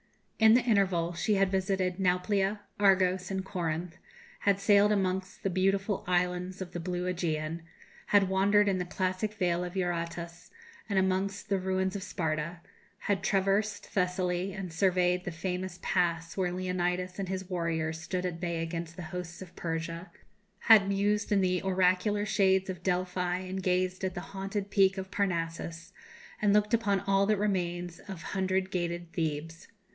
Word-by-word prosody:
In 220 0 +7
the 250 - +5
interval 190 -7 +2
she 180 +5 +1
had 195 -1 +2
visited 190 -1 0
Nauplia, 195 +2 +1 0.2
Argos, 190 -2 +3
and 190 -1 -2
Corinth; 170 -2 -3 0.4
had 200 -1 +2
sailed 205 +1 +5
amongst 190 -2 -1
the 195 - 0
beautiful 195 +2 +1
islands 180 +1 0
of 185 -2 -6
the 175 - -4
blue 180 +1 -3
Ægean; 165 -3 -2 0.5
had 200 -2 +4
wandered 200 +2 +3
in 190 -2 +1
the 180 - -2
classic 185 +4 -2
vale 180 -4 +1
of 180 +1 -6
Eurotas, 170 -1 -3 0.4
and 200 - 0
amongst 190 +1 0
the 195 -1 +2
ruins 190 +1 -1
of 200 - -3
Sparta; 165 -3 -3 0.4
had 200 -2 0
traversed 200 +2 +1
Thessaly, 180 0 -1
and 185 -4 -6
surveyed 180 0 +2
the 175 - -4
famous 180 +2 -4
Pass 170 -2 0
where 185 -2 0
Leonidas 180 0 -2
and 190 -2 -3
his 190 -1 -3
warriors 160 -3 -2
stood 180 +2 -3
at 170 -2 -3
bay 170 -2 -2
against 165 0 -5
the 180 - -7
hosts 180 0 -5
of 180 - -15
Persia; 165 +1 -4 0.5
had 215 -4 +7
mused 205 +2 +1
in 200 -1 +4
the 180 -1 +1
oracular 190 +2 +2
shades 190 -2 +2
of 180 -2 -9
Delphi 180 0 0
and 185 +1 -4
gazed 185 0 0
at 185 -1 -1
the 175 - -3
haunted 195 +1 -4
peak 195 -1 +4
of 190 0 -5
Parnassus, 165 -3 -2 0.5
and 205 -1 +4
looked 210 +1 +3
upon 205 -4 +2
all 195 0 +2
that 215 0 +3
remains 175 -4 -1
of 185 -4 -9
hundred 190 0 -1
gated 175 -2 -3
Thebes. 160 0 -3
185 Hz, 160 wpm, -30 LUFS, 175-195 Hz, 0.5 s, In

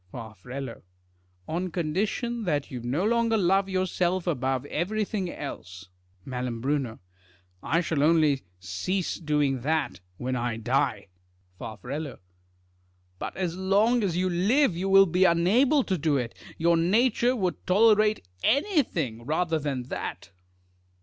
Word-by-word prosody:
Far. 110 -2 -8 1.1
On 180 +3 -2
condition 205 +8 -2
that 145 -5 -1
you 125 - -4
no 130 - -1
longer 230 0 +2
love 195 0 +2
yourself 185 -1 0
above 135 -5 -1
everything 195 +3 -2
else. 95 - -8 0.4
3fal. 125 0 -2 0.6
I 165 +3 +1
shall 160 -4 -1
only 155 -3 +4 0.2
cease 95 - -2
doing 150 -5 0
that 150 - -1 0.2
when 130 +3 -2
I 120 -2 -2
die. 115 -4 0 0.5
Far. 110 0 -7 1.4
But - - -5
as 180 -3 -2
long 205 +6 +2
as 180 -4 0
you 185 +1 +1
live 195 - +2
you 190 +3 -2
will 195 0 +8
be 180 +1 +2
unable 230 - +4
to 190 -6 -1
do 145 -1 +2
it. 120 -3 -3 0.2
Your 170 +1 +3
nature 235 +8 +3
would 185 -6 -2
tolerate 215 - +4 0.2
anything 230 - +1
rather 160 +4 0
than 140 -4 -2
that. - - -5
170 Hz, 125 wpm, -27 LUFS, 135-195 Hz, 1.4 s, will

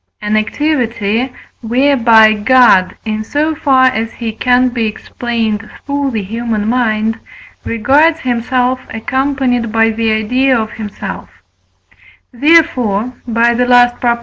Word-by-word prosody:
an 210 0 -1
activity 235 -1 -1 0.3
whereby 235 -3 +4
God, 215 -4 +3
in 215 0 -3
so 300 +7 -1
far 265 -3 +2
as 225 -3 0
he 230 -2 -5
can 250 +3 +1
be 240 -2 -2
explained 220 -1 -4 0.2
through 280 -1 -2
the 220 -4 -3
human 220 0 -3
mind, 225 -2 0 0.4
regards 290 +8 +2
himself 250 +1 -1
accompanied 255 0 -2
by 225 0 +2
the 225 0 -1
idea 250 +5 +1
of 220 0 -4
himself; 210 -3 -7 1.0
therefore 250 -6 +2
(by 235 +1 +2
the 245 +1 0
last 245 0 +3
Prop.) 235 -1 +1
235 Hz, 120 wpm, -14 LUFS, 220-260 Hz, 1.0 s, whereby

